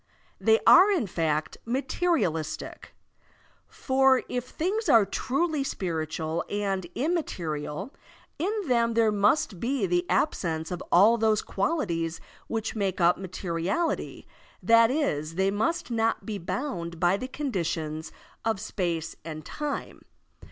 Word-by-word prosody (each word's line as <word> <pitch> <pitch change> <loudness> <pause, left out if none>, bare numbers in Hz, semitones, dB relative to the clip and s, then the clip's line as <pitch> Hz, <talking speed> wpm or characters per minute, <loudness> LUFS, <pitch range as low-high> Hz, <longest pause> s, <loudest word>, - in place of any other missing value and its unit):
They 220 0 +4
are 375 +3 +8
in 365 - +1
fact 160 -4 -1
materialistic. 250 - -2 0.7
For 265 -1 +2
if 245 -1 -3
things 380 - -2
are 225 -6 +6
truly 285 - -1
spiritual 160 - -3
and 195 -3 -2
immaterial, 190 - -3 0.5
in 365 +6 0 0.2
them 235 -2 +2
there 225 -2 +4
must 205 - +2
be 245 +1 0
the 175 -1 0
absence 165 -3 0
of 180 - -4
all 215 +6 +6
those 220 -1 +2
qualities 180 - -1 0.3
which 225 0 -3
make 195 -3 -1
up 175 +1 +4
materiality, 185 - -2 0.4
that 230 0 +6
is, 165 - -1
they 190 +2 +2
must 230 +8 -1
not 225 -1 0
be 210 -3 -4
bound 170 - -4
by 175 +2 +3
the 255 +6 -4
conditions 170 - -3 0.3
of 220 -3 0
space 175 -6 -3
and 155 -1 -7
time. 295 -2 -5
205 Hz, 125 wpm, -27 LUFS, 170-260 Hz, 0.7 s, are